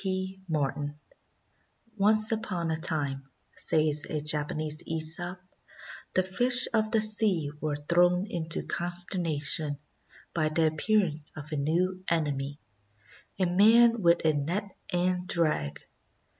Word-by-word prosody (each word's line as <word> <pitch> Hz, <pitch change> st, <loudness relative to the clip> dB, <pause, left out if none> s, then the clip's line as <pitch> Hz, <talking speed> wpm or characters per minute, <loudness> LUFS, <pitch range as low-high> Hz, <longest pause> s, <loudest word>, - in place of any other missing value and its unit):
P. 190 Hz, 0 st, -3 dB
MARTIN 145 Hz, -1 st, -2 dB, 1.0 s
"Once 215 Hz, +2 st, +4 dB
upon 185 Hz, -7 st, -2 dB
a 160 Hz, -, -2 dB
time," 140 Hz, -5 st, -2 dB, 0.3 s
says 155 Hz, -2 st, 0 dB
a 155 Hz, -, -2 dB
Japanese 150 Hz, +1 st, -2 dB
^sop, 165 Hz, +3 st, -2 dB, 0.8 s
"the 185 Hz, -, +3 dB
fish 245 Hz, +7 st, +3 dB
of 215 Hz, -1 st, +1 dB
the 225 Hz, -, +2 dB
sea 210 Hz, -8 st, +2 dB
were 155 Hz, -1 st, -1 dB
thrown 175 Hz, +5 st, +2 dB
into 165 Hz, -4 st, -1 dB
consternation 170 Hz, -4 st, 0 dB, 0.6 s
by 155 Hz, -2 st, 0 dB
the 160 Hz, +1 st, +1 dB
appear 195 Hz, +7 st, +2 dB
ance 155 Hz, -2 st, -7 dB
of 155 Hz, 0 st, -10 dB
a -, -, -2 dB
new 180 Hz, +6 st, -1 dB
enemy 145 Hz, -4 st, -1 dB, 0.4 s
— 100 Hz, -, -27 dB
a 185 Hz, -, +3 dB
man 225 Hz, +6 st, +5 dB
with 170 Hz, -2 st, +3 dB
a 155 Hz, -, +4 dB
net 180 Hz, +8 st, -3 dB, 0.2 s
and 180 Hz, 0 st, 0 dB
drag. 150 Hz, -, +1 dB
170 Hz, 130 wpm, -28 LUFS, 150-190 Hz, 1.0 s, man